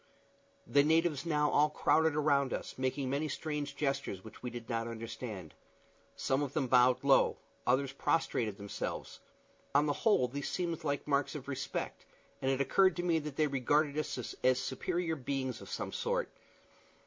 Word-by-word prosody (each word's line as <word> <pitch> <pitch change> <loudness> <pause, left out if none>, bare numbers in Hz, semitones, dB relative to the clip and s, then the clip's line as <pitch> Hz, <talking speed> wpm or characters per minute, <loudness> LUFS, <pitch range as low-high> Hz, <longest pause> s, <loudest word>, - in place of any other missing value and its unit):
The 140 - +4
natives 160 0 +2
now 150 -2 +2
all 150 +1 +4
crowded 160 0 +3
around 140 -3 +2
us, - - -4
making 130 +1 -1
many 140 +4 0
strange 150 -1 -3
gestures, 135 -10 -2
which 110 - -12
we 125 - -3
did 120 -1 -8
not 115 -1 -1
understand. 110 - -6 0.6
Some 135 +1 0
of 140 -2 -3
them 150 - +1
bowed 125 +1 +4
low, 140 -1 +4 0.3
others 130 +2 +2
prostrated 115 -8 0
themselves; 100 0 -5 0.6
on 145 +1 +5
the 145 - +1
whole 205 - +3
these 140 +3 -4
seemed 170 -2 -2
like 145 -2 -1
marks 140 +1 +1
of 140 -2 -7
respect, 135 -2 -4 0.3
and 130 - +1
it 135 0 +1
occurred 185 +6 +4
to 175 - -2
me 170 -2 +2
that 150 -2 -6
they 155 - +3
regarded 145 +2 +1
us 140 -5 -3
as 130 0 +4
superior 165 +6 -2
beings 130 -3 -3
of - - -10
some - - -4
sort. - - -1
140 Hz, 170 wpm, -33 LUFS, 130-150 Hz, 0.6 s, on